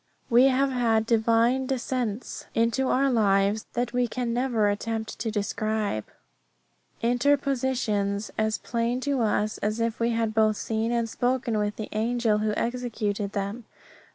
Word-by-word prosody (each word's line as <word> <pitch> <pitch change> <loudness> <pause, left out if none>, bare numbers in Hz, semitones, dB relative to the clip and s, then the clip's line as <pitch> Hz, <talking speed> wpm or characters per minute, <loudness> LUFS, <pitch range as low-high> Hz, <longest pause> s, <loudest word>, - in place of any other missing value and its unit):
We 240 +3 +7
have 270 +1 +3
had 225 -3 +2
divine 230 +3 +2
descents 250 -3 -3
into 230 +3 +2
our 275 +1 +2
lives 205 -2 +2
that 240 0 -2
we 245 0 +2
can 240 0 -2
never 240 -4 +1
attempt 220 +2 -3
to 225 +2 -2
describe. 215 - -2 1.0
Interpositions 245 -5 +1
as 220 0 0
plain 235 +1 -1
to 280 -2 0
us 215 -1 0
as 215 +2 -1
if 230 -1 -1
we 230 0 +2
had 225 -1 0
both 215 -1 +3
seen 225 +1 -1
and 235 -1 0
spoken 245 -2 0
with 210 0 -1
the 215 - -5
angel 225 0 +1
who 215 0 0
executed 220 -4 -2
them. 205 +3 -3
230 Hz, 145 wpm, -26 LUFS, 215-245 Hz, 1.0 s, We